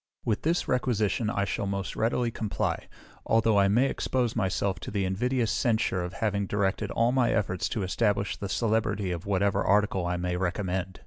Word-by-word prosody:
With 110 -3 0
this 170 +3 0
requisition 115 -3 +1
I 100 -2 0
shall 100 - -2
most 100 0 -3
readily 115 +1 0
comply, 110 -2 -2 0.4
although 115 -2 +3
I 100 - +4
may 115 +7 +3
expose 125 -3 -1
myself 95 -3 0
to - - -7
the 100 -2 -1
invidious 115 +5 0
censure 110 -7 +1
of 90 +1 -5
having 100 -2 -1
directed 100 -1 0
all 115 +1 +2
my 125 -2 +2
efforts 95 -5 0
to 105 - -2
establish 100 +1 0
the 100 - -6
celebrity 110 -3 0
of 85 +2 -5
whatever 100 0 +1
article 100 -3 +2
I 90 0 -1
may 90 0 -2
recommend. 95 0 -2
100 Hz, 180 wpm, -28 LUFS, 95-115 Hz, 0.4 s, I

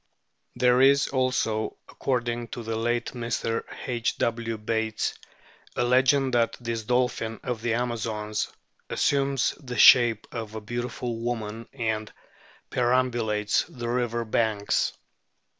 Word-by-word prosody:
There 125 0 +4
is 140 +1 +5
also, 130 -5 0
according 120 -2 -2
to 120 - -7
the 115 0 -3
late 120 +1 -1
Mr. 115 -1 -2 0.2
H. 120 -2 -1
W. 115 -1 -1
Bates, 110 0 -1 0.6
a - - +1
legend 130 +2 +3
that 115 -1 +2
this 115 -2 -3
dolphin 120 -1 0
of 125 -4 -3
the 115 -1 0
Amazons 110 -3 -2 0.4
assumes 140 -2 +1
the 125 -3 -6
shape 120 -4 +7
of 110 -2 -6
a - - -3
beautiful 120 +1 -4
woman 115 -1 -4
and 110 -4 -2 0.6
peram 125 +1 +2
bulates 105 -3 0
the 120 -1 -5
river 120 -1 -1
banks. 110 -2 +1
120 Hz, 125 wpm, -26 LUFS, 110-125 Hz, 0.6 s, shape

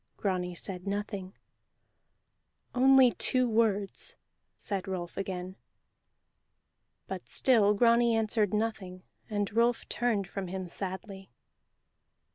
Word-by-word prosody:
Grani 180 -3 -2
said 180 +2 -4
nothing. 200 -2 -4 1.4
"Only 260 0 +6
two 255 +1 +2
words," 215 -3 +1 0.4
said 200 -2 -4
Rolf 180 -2 -5
again. 185 -1 -5 1.5
But - - -7
still 215 -5 +4
Grani 235 +1 +4
answered 215 -2 +1
nothing, 210 -4 -3 0.3
and 205 -1 -2
Rolf 235 +1 +2
turned 225 -6 0
from 195 0 -5
him 185 0 -5
sadly. 190 +1 -7
200 Hz, 95 wpm, -29 LUFS, 190-230 Hz, 1.5 s, Only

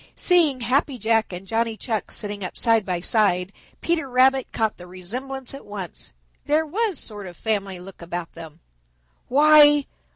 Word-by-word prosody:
Seeing 320 -8 +4
Happy 260 +3 0
Jack 225 -1 +1
and 180 +1 -7
Johnny 225 +1 -1
Chuck 220 -3 -3
sitting 205 -2 -5
up 185 - -6
side 225 -2 +3
by 180 -2 -2
side, 190 -2 +1 0.3
Peter 330 -5 -1
Rabbit 260 +1 +3
caught 220 -1 -1
the 180 - -12
resemblance 250 +10 -6
at 275 - -9
once. 195 -5 -8 0.4
There 310 +2 +2
was 400 +4 -1
sort 205 -3 -6
of 175 - -11
family 200 -4 -2
look 185 +1 -12
about 170 0 -5
them. 165 -1 -12 0.7
"Why! 295 +1 +6
225 Hz, 160 wpm, -23 LUFS, 190-270 Hz, 0.7 s, Why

